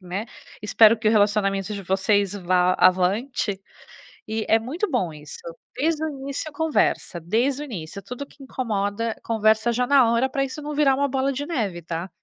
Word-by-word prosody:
né, 185 +5 -4 0.3
espero 215 +2 +5
que 220 - -4
o - - +6
relacionamento 205 -1 +1
de 200 -1 -5
vocês 195 +1 +1
vá 180 -1 +2
avante, 195 +3 +2 0.7
e 220 0 -2
é 225 0 +4
muito 320 - -3
bom 215 - -1
isso. 150 -1 -10 0.4
Desde 315 +2 0
o 315 - -1
início, 280 +2 -5
conversa, 300 - 0
desde 245 - 0
o - - -4
início. 200 - -7
Tudo 250 +7 -7
que 285 - -24
incomoda, 225 -3 -2
conversa 220 +1 +2
já 250 +2 +1
na 255 -4 +5
hora, 240 +3 +2
pra 275 +1 -1
isso 275 +3 -6
não 300 0 -5
virar 280 -2 +4
uma 280 +1 +1
bola 270 +1 0
de 285 +2 -4
neve, 210 - -3
tá? 170 +2 -5
225 Hz, 180 wpm, -23 LUFS, 195-275 Hz, 0.7 s, o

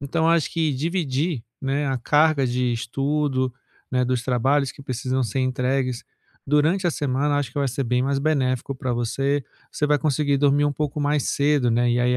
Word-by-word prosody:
então 160 +4 0
acho 170 -3 +2
que 160 -3 +1
dividir, 155 -2 -1 0.2
né, 140 +2 0
a 135 -1 0
carga 150 +2 +3
de 125 0 0
estudo, 135 +2 -1 0.4
né, 125 0 +1
dos 125 -1 -1
trabalhos 130 +2 +1
que - - -13
precisam 130 0 -2
ser 115 +3 -2
entregues 130 -1 -1 0.4
durante 155 +6 +2
a - - +3
semana, 145 0 0
acho 140 -4 -2
que - - -4
vai 140 -1 +1
ser 135 +2 -2
bem 125 +1 +1
mais 140 +1 0
benéfico 135 -3 0
pra 130 -1 -3
você, 135 +4 0 0.3
você 150 - -1
vai 150 0 +3
conseguir 145 -1 +1
dormir 145 +1 +3
um 145 - 0
pouco 150 0 -3
mais 145 -1 +1
cedo, 140 -4 +2
né, 120 +1 +2
e, 120 - +2
aí, 125 0 +2
135 Hz, 190 wpm, -23 LUFS, 125-145 Hz, 0.4 s, carga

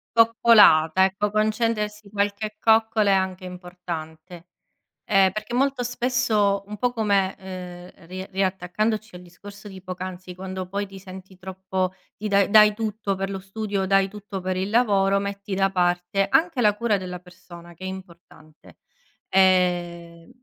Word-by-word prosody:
Coccolata, 210 -7 +6
ecco, 195 +2 -1
concedersi 215 -1 -1
qualche 205 +1 -2
coccola 220 -2 +3
è - - +5
anche 190 -1 -1
importante. 175 -1 -8 0.6
Ehm, 195 -2 +4
perché 215 +4 -6
molto 270 -1 +1
spesso, 235 -5 0
un 210 0 -8
po' 245 +2 0
come 200 -4 0
ehm, 180 -2 -10
ri 185 +1 -6
riattaccandoci 195 +3 -2
al 180 - -10
discorso 200 +4 -13
di 190 -1 -11
poc'anzi, 185 -1 -7
quando 185 0 -6
poi 200 +2 -2
ti 195 0 -11
senti 190 0 -12
troppo 190 0 -3 0.2
ti 215 - -6
dai 200 -1 +2
dai 210 0 +7
tutto 215 -2 -3
per 195 +1 -4
lo 195 - -4
studio, 195 0 -3
dai 195 0 +3
tutto 205 -1 -8
per 185 0 -3
il 190 +2 -2
lavoro, 200 -4 +2
metti 200 0 -5
da 195 0 +1
parte 180 +1 0
anche 325 - +2
la 210 -3 +4
cura 225 -2 +1
della 180 -2 -6
persona, 175 -1 -14
che 185 - -11
è - - -4
importante. 170 -4 -12 0.5
Ehm, 175 -3 +1
195 Hz, 150 wpm, -23 LUFS, 185-210 Hz, 0.6 s, dai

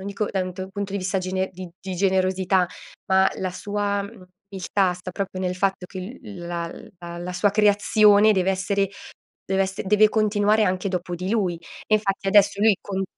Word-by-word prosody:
non 190 - -7
dico 200 +1 -2
da 195 - -1
un 185 0 -5
to 185 +1 -6
punto 200 0 -5
di 200 - -1
vista 190 +1 -2
gene 185 0 -1
di 185 0 -8
di 190 -1 -5
generosità, 185 0 +2 0.4
ma 190 0 +4
la 185 - -2
sua, 205 +2 -2
mhmm, 200 -1 -11 0.3
umiltà 190 -1 0
sta 180 +1 -8
proprio 185 0 -4
nel 180 -1 -1
fatto 190 0 -1
che 185 0 -8 0.2
l 200 -7 -9
la 170 -1 -3 0.3
la 170 0 -7
la 175 +1 -5
sua 205 +3 +2
creazione 210 +1 +5
deve 190 -2 +1
essere 195 +1 0 0.6
deve 190 0 0
esse 190 +1 -3
deve 210 +2 +5
continuare 215 0 +2
anche 185 +1 0
dopo 180 -1 -3
di 180 +2 -4
lui. 195 -6 0 0.3
E 215 - +3
infatti 195 -2 -2
adesso 200 0 +4
lui 220 -1 +6
con 195 -1 -3
195 Hz, 195 wpm, -23 LUFS, 185-205 Hz, 0.6 s, lui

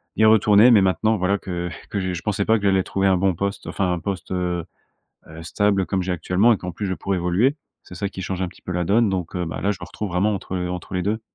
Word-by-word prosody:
d'y 110 - +4
retourner, 110 +1 +6
mais 105 -4 +6
maintenant 95 +4 +2
voilà 95 +2 +1
que 90 -2 -4 0.2
que 100 - -1
je 95 -1 -2
je 90 - -5
pensais 105 -1 0
pas 110 - +4
que 105 - -7
j'allais 95 -1 +3
trouver 95 +1 -1
un 95 -1 +4
bon 95 0 +1
poste, 100 +3 -3
enfin 95 -3 -1
un 90 - -2
poste, 95 0 -5
heu 90 -2 -2 0.6
heu, 80 +1 -10
stable 100 +3 +1
comme 95 0 -1
j'ai 90 0 -2
actuellement, 90 +6 +2
et - - -1
qu'en 90 -1 -6
plus 100 +3 -4
je 95 - -1
pourrais 95 0 -2
évoluer, 90 +11 +2 0.3
c'est - - -13
ça 100 +2 -3
qui 95 - -8
change 95 0 -3
un 95 - 0
petit 90 - -15
peu - - -5
la 90 -1 -1
donne, 110 +4 +3
donc, 90 -3 -3
heu, 90 -1 -1
bah, 80 - -5
là, 100 - +1
je 100 - -5
me - - -5
retrouve 105 - -5
vraiment 95 +4 +1
entre 95 -1 -4
entre 90 0 -5
les 90 - -1
2. 105 +3 -1
95 Hz, 280 wpm, -22 LUFS, 90-100 Hz, 0.6 s, retourner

